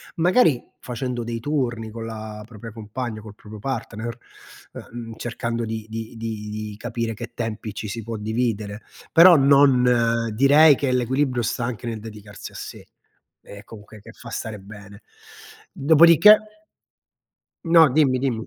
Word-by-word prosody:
Magari 170 - +3 0.2
facendo 125 0 -4
dei 115 0 -4
turni 120 -6 -2
con 115 0 -7
la 110 -1 -7
propria 115 -1 -10
compagna, 110 +1 -6
col 105 -1 -12
proprio 105 0 -12
partner, 115 -2 -5 0.6
uhm, 115 -1 -9
cercando 115 0 -4
di 110 -1 -5
di 115 +1 -7
di 110 -2 -6
di 105 0 -6
capire 115 0 -4
che 105 - -9
tempi 110 -2 -5
ci 105 - -6
si 115 +3 -5
può 115 +1 -6
dividere. 110 -1 -3 0.3
Però 170 +1 +8
non 125 -5 +3
direi 145 +5 +6
che 135 -1 -1
l'equilibrio 125 +1 0
sta 120 +2 -2
anche 120 0 -5
nel 115 -1 -4
dedicarsi 105 -2 -10
a - - -18
sé - - -9 0.5
e 100 0 -12
comunque 110 -1 -13
che - - -14
fa - - -12
stare 110 -2 -5
bene. 100 +1 -13 0.7
Dopodiché 170 - +5 1.0
No, 165 -2 +6
dimmi, 140 -4 +3
dimmi. 120 -4 -2
115 Hz, 145 wpm, -22 LUFS, 110-130 Hz, 1.0 s, Però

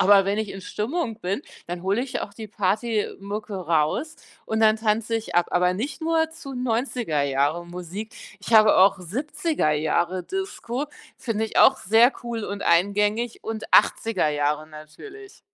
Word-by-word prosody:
aber 195 0 +6
wenn 200 +2 0
ich 215 -2 -2
in 195 - -7
Stimmung 225 - -3
bin, 195 +8 -2 0.3
dann 175 0 -5
hole 200 +6 +1
ich 265 - -4
auch 200 - -6
die 220 -1 -8
Partymucke 210 0 -2
raus 170 - 0 0.3
und 220 - -2
dann 220 -1 +5
tanze 220 +1 0
ich 225 -5 -3
ab, 175 - +4
aber 180 0 +3
nicht 255 +9 -4
nur 320 0 +1
zu 275 -4 -9
90er 240 - -1
Jahre 140 +5 0
Musik. 180 +5 -7 0.3
Ich 215 - -6
habe 215 -1 +7
auch 195 +1 +5
70er 290 - -1
Jahre 170 +4 0
Disco 300 -9 -4 0.3
finde 220 -2 -2
ich 220 - -2
auch - - +7
sehr 225 +6 +5
cool 230 -2 -4
und 200 0 -5
eingängig, 210 +6 +1
und 220 -1 -4
80er 215 -8 +3
Jahre 150 +1 -1
natürlich. 160 - -12
210 Hz, 160 wpm, -24 LUFS, 180-235 Hz, 0.3 s, habe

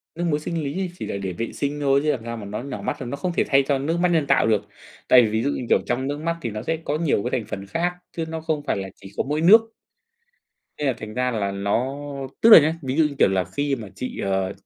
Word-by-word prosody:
Nước 175 +1 -3
muối 150 -3 +1
sinh 165 +1 -3
lý 180 +6 -3
chỉ - - -5
là - - -3
để 95 -2 -3
vệ 115 +7 -4
sinh 145 +1 -3
thôi 140 -1 +3
chứ 155 - +2
làm 130 -5 -1
sao 115 0 -4
mà 105 - -7
nó 105 +4 -5
nhỏ 140 -1 -6
mắt, - - -2
nó 125 +2 -4
không 180 +4 -2
thể - - +1
thay 135 0 +5
cho 140 -1 +1
nước 155 +5 -1
mắt 180 - +3
nhân 160 -4 +2
tạo - - +3
được. 105 -2 +2 0.5
Tại 125 -1 +8
vì 110 - +2
ví 110 +1 0
dụ 140 - +1
như, 125 - -4
kiểu, - - +5
trong 130 +2 -1
nước 145 +1 -3
mắt 170 +1 -1
thì 115 - -2
nó 105 +1 -5
sẽ 160 - -1
có 150 +1 -1
nhiều 155 -11 +1
cái 125 0 -1
thành 105 - -10
phần 100 -2 -6
khác 170 - -1 0.2
chứ 165 - -1
nó 160 0 -4
không 155 -2 -2
phải - - 0
là 95 -1 -4
chỉ 100 0 -13
có - - +1
mỗi 150 +3 -2
nước. 220 +7 +6 1.1
Thế 150 - -1
là 135 - +3
thành 110 0 -8
ra 125 0 0
là 105 -4 -1
nó 100 +8 -1 0.4
tức 230 - +6
là 215 - +12
nhá, 155 +2 +1
ví 130 +1 -3
dụ 160 - +5
như, 150 -2 -2
kiểu - - +5
là, 95 -1 +1
khi 145 -1 -2
mà 110 -4 -8
chị, 125 +7 -6
ờ, 95 -1 -1
135 Hz, 295 wpm, -23 LUFS, 110-155 Hz, 1.1 s, là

